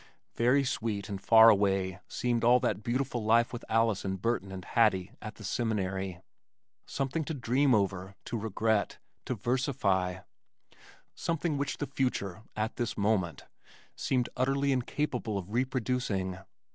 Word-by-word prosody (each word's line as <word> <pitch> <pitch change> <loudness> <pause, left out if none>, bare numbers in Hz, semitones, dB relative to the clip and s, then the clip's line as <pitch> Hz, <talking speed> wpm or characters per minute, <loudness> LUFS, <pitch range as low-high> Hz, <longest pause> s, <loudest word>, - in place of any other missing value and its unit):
Very 125 +4 +3
sweet 110 -6 -2
and 100 -2 -5
far 110 +2 +8
away 95 -3 +2
seemed 120 -2 -1
all 120 +2 +6
that 120 -4 0
beautiful 120 +1 -1
life 115 +2 +3
with 120 - -6
Alice 115 -3 +2
and 95 -1 -3
Burton 100 -2 -1
and 95 -1 -7
Hattie 100 -5 +2
at 110 0 -7
the 105 - -12
Seminary, 95 -4 -2 0.7
something 135 +4 -2
to 160 - -3
dream 130 +1 +2
over, 95 -1 -1
to 125 -1 -4
regret, 110 -1 0 0.3
to 125 - -2
versify, 100 -6 0 0.9
something 165 -1 -1
which 140 0 -2
the 145 - -2
future 120 -9 -2
(at 110 +2 -2
this 120 -2 -2
moment) 100 -5 0 0.5
seemed 125 -2 0
utterly 135 +2 +1
incapable 125 -4 -1
of 95 +1 -6
reproducing. 120 -7 -1
115 Hz, 140 wpm, -30 LUFS, 100-125 Hz, 0.9 s, far